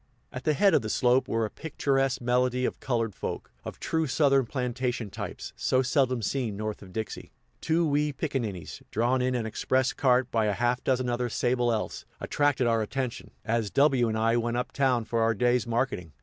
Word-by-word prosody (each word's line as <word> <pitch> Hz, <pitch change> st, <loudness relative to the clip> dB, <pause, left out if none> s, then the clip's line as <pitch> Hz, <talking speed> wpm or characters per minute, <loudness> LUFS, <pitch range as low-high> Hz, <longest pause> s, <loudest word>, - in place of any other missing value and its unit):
At 125 Hz, -, -7 dB
the 155 Hz, -, +2 dB
head 200 Hz, +6 st, +4 dB
of -, -, +4 dB
the 110 Hz, -, -4 dB
slope 125 Hz, +3 st, +3 dB
were 115 Hz, 0 st, 0 dB
a 105 Hz, -, -6 dB
picturesque 135 Hz, -4 st, -1 dB
medley 125 Hz, +1 st, +1 dB
of -, -, -3 dB
colored 115 Hz, -4 st, -1 dB
folk, -, -, -5 dB
of -, -, -8 dB
true 160 Hz, -1 st, 0 dB
Southern 135 Hz, -1 st, +3 dB
plantation 125 Hz, -3 st, -2 dB
types, -, -, -6 dB
so 130 Hz, 0 st, +1 dB
seldom 130 Hz, -3 st, +1 dB
seen 115 Hz, -4 st, -1 dB
north 110 Hz, 0 st, -4 dB
of 95 Hz, -2 st, -12 dB
Dixie. 110 Hz, +2 st, -5 dB, 0.3 s
Two 165 Hz, +1 st, +2 dB
wee 150 Hz, +1 st, +1 dB
picaninnies, 125 Hz, -, -4 dB
drawn 120 Hz, +4 st, +1 dB
in 125 Hz, 0 st, +1 dB
an 120 Hz, -2 st, -1 dB
express 130 Hz, +4 st, 0 dB
cart 125 Hz, -2 st, +2 dB
by 110 Hz, -2 st, +2 dB
a 105 Hz, -, +1 dB
half 120 Hz, +3 st, 0 dB
dozen 130 Hz, -1 st, +1 dB
other 120 Hz, 0 st, -1 dB
sable 120 Hz, +1 st, +1 dB
elfs, 115 Hz, -2 st, -2 dB
attracted 145 Hz, -3 st, +1 dB
our 115 Hz, -1 st, +2 dB
attention, 125 Hz, +3 st, -3 dB, 0.2 s
as 115 Hz, -2 st, 0 dB
W 135 Hz, -2 st, +3 dB
and 110 Hz, -, -1 dB
I 115 Hz, +1 st, +2 dB
went 120 Hz, 0 st, -1 dB
up 125 Hz, -, -2 dB
town 130 Hz, -4 st, +1 dB
for 115 Hz, 0 st, 0 dB
our 115 Hz, 0 st, +2 dB
day's 120 Hz, +2 st, +2 dB
marketing. 115 Hz, -, -1 dB
125 Hz, 195 wpm, -28 LUFS, 115-130 Hz, 0.3 s, head